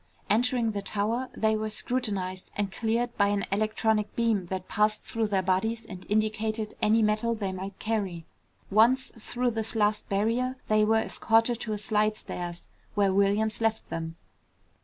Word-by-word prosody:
Entering 235 Hz, +1 st, +2 dB
the 205 Hz, -1 st, -3 dB
tower, 220 Hz, +6 st, -1 dB
they 220 Hz, 0 st, +2 dB
were 215 Hz, 0 st, -2 dB
scrutinized 205 Hz, -5 st, -2 dB
and 200 Hz, -1 st, -1 dB
cleared 235 Hz, +3 st, -1 dB
by 200 Hz, -, +4 dB
an 205 Hz, 0 st, 0 dB
electronic 215 Hz, +1 st, +1 dB
beam 225 Hz, -6 st, +1 dB
that 185 Hz, 0 st, -4 dB
passed 210 Hz, 0 st, +1 dB
through 225 Hz, -1 st, -1 dB
their 195 Hz, -2 st, +1 dB
bodies 220 Hz, +5 st, 0 dB
and 185 Hz, -2 st, -10 dB
indicated 215 Hz, +1 st, 0 dB
any 220 Hz, +1 st, +4 dB
metal 215 Hz, +2 st, +1 dB
they 200 Hz, -3 st, -2 dB
might 190 Hz, +1 st, -6 dB
carry. 195 Hz, -7 st, -2 dB, 0.5 s
Once 240 Hz, +6 st, +4 dB
through 245 Hz, +2 st, -1 dB
this 225 Hz, 0 st, -3 dB
last 210 Hz, -1 st, +1 dB
barrier, 230 Hz, +6 st, +1 dB
they 215 Hz, 0 st, +4 dB
were 220 Hz, +1 st, +4 dB
escorted 225 Hz, +1 st, +2 dB
to 220 Hz, -3 st, -3 dB
a -, -, -2 dB
slidestairs, 210 Hz, -5 st, -2 dB, 0.3 s
where 200 Hz, -2 st, +3 dB
Williams 205 Hz, +3 st, +2 dB
left 225 Hz, -1 st, 0 dB
them. 165 Hz, 0 st, -4 dB
215 Hz, 160 wpm, -28 LUFS, 200-225 Hz, 0.5 s, by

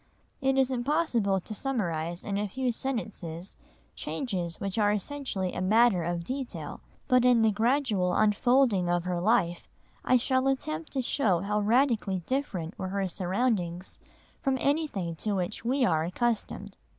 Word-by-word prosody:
It 270 Hz, 0 st, +2 dB
is 265 Hz, -1 st, +3 dB
impossible 240 Hz, -7 st, +1 dB
to 215 Hz, -, -7 dB
summarise 175 Hz, -, -2 dB
in 200 Hz, -1 st, -2 dB
a 210 Hz, -, -1 dB
few 255 Hz, +5 st, -1 dB
sentences 205 Hz, -9 st, -4 dB, 0.4 s
changes 180 Hz, -, -3 dB
which 195 Hz, +2 st, -2 dB
are 205 Hz, -1 st, +4 dB
essentially 210 Hz, -4 st, -2 dB
a -, -, -3 dB
matter 210 Hz, -1 st, +4 dB
of 170 Hz, 0 st, -2 dB
detail, 260 Hz, +6 st, -5 dB, 0.3 s
but 255 Hz, -2 st, +4 dB
in 245 Hz, -2 st, +5 dB
the 220 Hz, -, +4 dB
gradual 220 Hz, -4 st, +1 dB
unfolding 215 Hz, -2 st, +3 dB
of 175 Hz, -1 st, +1 dB
her 180 Hz, -1 st, -2 dB
life 175 Hz, -4 st, +1 dB, 0.3 s
I 255 Hz, -, +4 dB
shall 260 Hz, +2 st, +1 dB
attempt 165 Hz, -13 st, -2 dB
to 265 Hz, -, 0 dB
show 205 Hz, -, +1 dB
how 210 Hz, +2 st, 0 dB
radically 215 Hz, -4 st, +2 dB
different 205 Hz, -, -3 dB
were 185 Hz, -, -3 dB
her 195 Hz, 0 st, -1 dB
surroundings 185 Hz, -1 st, -1 dB, 0.4 s
from 270 Hz, -1 st, +1 dB
anything 280 Hz, -, -1 dB
to 210 Hz, +4 st, -1 dB
which 185 Hz, +1 st, -2 dB
we 255 Hz, +2 st, +2 dB
are 160 Hz, -6 st, +2 dB
accustomed. 225 Hz, +6 st, -2 dB
210 Hz, 150 wpm, -28 LUFS, 180-255 Hz, 0.4 s, in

